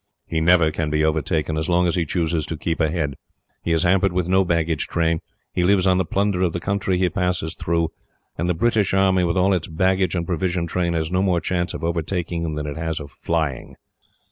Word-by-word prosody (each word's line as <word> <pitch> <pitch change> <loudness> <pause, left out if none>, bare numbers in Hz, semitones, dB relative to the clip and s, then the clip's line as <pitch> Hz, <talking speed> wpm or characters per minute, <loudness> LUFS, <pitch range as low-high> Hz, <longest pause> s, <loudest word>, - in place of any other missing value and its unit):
"He 80 -1 -2
never 85 -1 +4
can 75 0 -2
be 75 0 +1
overtaken, 80 0 0
as 80 - -3
long 90 0 +3
as 85 - +1
he 85 -3 0
chooses 80 -2 -1
to 80 - -4
keep 80 +1 -2
ahead. 80 -3 0 0.5
He 85 - -2
is 80 0 +2
hampered 95 +1 +3
with 90 -1 0
no 95 +1 +4
baggage 85 -3 0
train. 80 -1 +1 0.3
He 90 - +1
lives 95 0 +3
on 95 -1 +3
the 95 - +1
plunder 100 0 0
of 90 -3 +1
the 85 - -2
country 95 0 -1
he 90 0 +2
passes 90 -3 -1
through; 85 -1 -1 0.5
and 85 +3 -2
the 90 - +1
British 105 0 +1
army, 95 -1 +3
with 85 +1 0
all 95 +2 +3
its 85 -3 -1
baggage 95 +2 +1
and 85 -1 -1
provision 85 0 -1
train, 85 0 -1
has 80 0 -2
no 90 0 +1
more 90 -3 +2
chance 90 0 -2
of - - -7
overtaking 85 0 -2
him 80 -2 -3
than 75 0 -3
it 75 0 -5
has 80 0 -2
of 70 -2 -9
flying." 80 -6 -2
85 Hz, 225 wpm, -22 LUFS, 80-90 Hz, 0.5 s, never